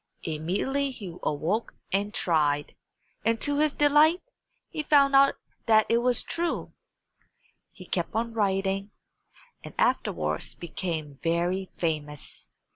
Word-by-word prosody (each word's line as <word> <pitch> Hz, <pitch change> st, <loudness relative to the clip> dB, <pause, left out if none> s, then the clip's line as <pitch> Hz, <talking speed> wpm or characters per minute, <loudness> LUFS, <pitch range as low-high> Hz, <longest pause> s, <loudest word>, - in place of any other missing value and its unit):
Immediately 190 Hz, -, -1 dB
he 200 Hz, -10 st, -8 dB
awoke 170 Hz, +10 st, -1 dB, 0.2 s
and 200 Hz, +2 st, 0 dB
tried, 150 Hz, -6 st, +1 dB, 0.5 s
and 225 Hz, +1 st, +1 dB
to 290 Hz, 0 st, +1 dB
his 305 Hz, 0 st, +3 dB
delight 295 Hz, +4 st, +4 dB, 0.5 s
he 310 Hz, -, -2 dB
found 285 Hz, -2 st, +4 dB
out 275 Hz, 0 st, +6 dB, 0.3 s
that 220 Hz, -1 st, +5 dB
it 230 Hz, -, +4 dB
was 245 Hz, 0 st, +2 dB
true. 340 Hz, 0 st, -2 dB, 1.0 s
He 185 Hz, -, -13 dB
kept 175 Hz, +2 st, -3 dB
on 230 Hz, +1 st, -1 dB
writing, 195 Hz, -1 st, 0 dB, 0.7 s
and -, -, -10 dB
afterwards -, -, 0 dB
became 160 Hz, -4 st, -5 dB
very 175 Hz, +3 st, 0 dB
famous. 150 Hz, -3 st, -4 dB
200 Hz, 120 wpm, -27 LUFS, 170-275 Hz, 1.0 s, out